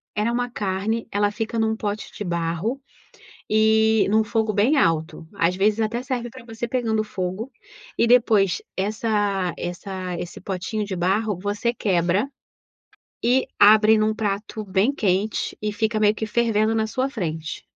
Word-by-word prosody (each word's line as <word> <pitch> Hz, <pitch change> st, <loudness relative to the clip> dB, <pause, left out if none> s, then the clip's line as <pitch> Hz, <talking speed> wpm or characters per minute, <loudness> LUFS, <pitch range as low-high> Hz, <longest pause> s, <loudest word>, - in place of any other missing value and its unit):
era 215 Hz, +3 st, +1 dB
uma 245 Hz, +1 st, 0 dB
carne; 210 Hz, +2 st, -2 dB
ela 205 Hz, 0 st, +1 dB
fica 225 Hz, +2 st, -3 dB
num 220 Hz, 0 st, +1 dB
pote 210 Hz, -1 st, -4 dB
de -, -, -4 dB
barro, 170 Hz, +7 st, -2 dB, 0.7 s
e 220 Hz, 0 st, +3 dB
num 220 Hz, +2 st, +3 dB
fogo 220 Hz, 0 st, 0 dB
bem 215 Hz, +8 st, +3 dB
alto. 165 Hz, -, 0 dB
Às 180 Hz, -2 st, +1 dB
vezes 205 Hz, +3 st, +2 dB
até 225 Hz, +2 st, -1 dB
serve 245 Hz, -2 st, -4 dB
pra 255 Hz, -2 st, -12 dB
você 230 Hz, 0 st, -5 dB
pegando 225 Hz, -3 st, 0 dB
fogo, 195 Hz, +4 st, -4 dB, 0.5 s
e 235 Hz, -, +3 dB
depois 225 Hz, -6 st, +4 dB, 0.2 s
essa 205 Hz, -2 st, 0 dB
essa 180 Hz, 0 st, -5 dB
esse 175 Hz, -, -7 dB
potinho 195 Hz, +3 st, -3 dB
de 200 Hz, -2 st, -4 dB
barro, 195 Hz, +3 st, 0 dB
você 205 Hz, +4 st, -1 dB
quebra, 190 Hz, +1 st, +1 dB, 0.9 s
e 250 Hz, +2 st, +3 dB
abre 215 Hz, +1 st, +7 dB
num 215 Hz, 0 st, +1 dB
prato 210 Hz, +1 st, -3 dB
bem 200 Hz, +7 st, +1 dB
quente, 200 Hz, 0 st, 0 dB
e 210 Hz, 0 st, -2 dB
fica 215 Hz, +1 st, 0 dB
meio 210 Hz, 0 st, +4 dB
que 220 Hz, -, -3 dB
fervendo 220 Hz, -1 st, +1 dB
na 220 Hz, -1 st, 0 dB
sua 260 Hz, +4 st, -1 dB
frente. 160 Hz, -, -4 dB
215 Hz, 155 wpm, -23 LUFS, 195-225 Hz, 0.9 s, abre